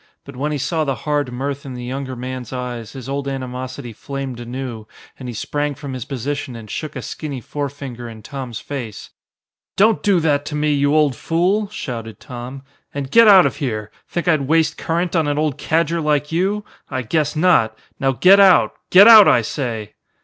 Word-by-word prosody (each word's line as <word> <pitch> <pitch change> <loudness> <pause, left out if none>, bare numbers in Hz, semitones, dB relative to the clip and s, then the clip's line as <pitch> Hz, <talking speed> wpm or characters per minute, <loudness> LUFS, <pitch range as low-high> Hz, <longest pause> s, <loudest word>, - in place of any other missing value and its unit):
But 140 - -11
when 145 +4 -2
he 150 - -1
saw 160 +3 -1
the 135 -3 -1
hard 145 -3 0
mirth 140 +3 -4
in 130 -2 -7
the 125 - -7
younger 130 +1 -5
man's 125 -1 -6
eyes, 125 -3 -5
his 130 -3 -8
old 140 0 -3
animosity 130 -1 -5
flamed 135 0 -6
anew 120 -2 -6 0.3
and 130 -2 -6
he - - -5
sprang 145 +5 -2
from 140 -1 -7
his 125 -3 -5
position 135 0 -4
and 110 -2 -10
shook 155 - -5
a - - -5
skinny 145 -4 -5
forefinger 135 -2 -6
in 110 -1 -11
Tom's 130 -4 -6
face. 125 -7 -7 0.7
"Don't 220 +2 +4
do 200 -3 +3
that 145 -3 +1
to 150 - -5
me, 150 0 +1
you 145 +1 +2
old 150 -4 +3
fool!" 185 - 0
shouted 115 - -6
Tom, 130 0 -8 0.3
"and 140 -1 -5
get 230 +3 +7
out 190 -3 +8
of - - -1
here. 110 -7 -3 0.2
Think 175 0 -3
I'd 155 -5 +2
waste 160 0 +2
current 170 +2 -2
on 160 -3 +2
an 145 0 0
old 150 -3 -1
cadger 165 +1 0
like 150 -1 0
you? 195 +5 0 0.2
I 130 - -3
guess 150 +5 0
not! 155 -10 +3 0.2
Now 135 -1 +2
get 190 +9 +6
out. 190 -2 +6 0.2
Get 195 +4 +8
out, 220 -3 +10
I 120 - +4
say!" 110 -4 -4
140 Hz, 195 wpm, -20 LUFS, 125-155 Hz, 0.7 s, out